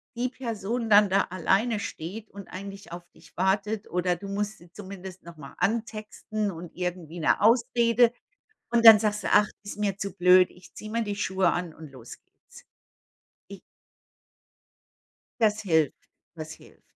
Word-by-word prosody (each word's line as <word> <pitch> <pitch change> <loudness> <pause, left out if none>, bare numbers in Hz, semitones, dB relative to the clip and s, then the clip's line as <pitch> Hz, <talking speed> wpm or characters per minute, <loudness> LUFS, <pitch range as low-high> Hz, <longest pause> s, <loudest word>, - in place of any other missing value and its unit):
die 245 +2 -1
Person 230 -2 -4
dann 205 -1 +6
da 195 +2 +3
alleine 195 +5 +1
steht 200 +4 -7
und 200 -1 -10
eigentlich 195 +1 -9
auf 175 0 -9
dich - - -21
wartet 200 +3 0
oder 180 0 0
du 200 +4 -9
musst 205 +1 -3
sie 170 0 -18
zumindest 190 -1 -10
noch 170 -1 -12
mal 140 -2 -11
antexten 215 -1 -2
und 170 -1 -10
irgendwie 175 -2 -5
'ne 160 - +2
Ausrede 235 +1 +3 0.6
Und 235 -1 +2
dann 220 -1 +12
sagst 210 -1 -1
du: - - -1
„Ach, 210 0 +5 0.2
ist 205 - -8
mir 200 -2 -1
zu 200 -1 -4
blöd. 180 0 +6
Ich 180 0 -18
ziehe 215 - -9
mir 230 +1 -1
die 205 -1 -3
Schuhe 190 -3 +1
an 175 -2 -3
und 155 -3 -12
los 125 -3 -12
geht's. - - -19 0.8
Ich“ 200 -2 -10 1.8
Das 215 -1 +2
hilft, 160 -8 +1 0.4
das 155 0 -7
hilft. - - -17
200 Hz, 165 wpm, -26 LUFS, 180-215 Hz, 1.8 s, dann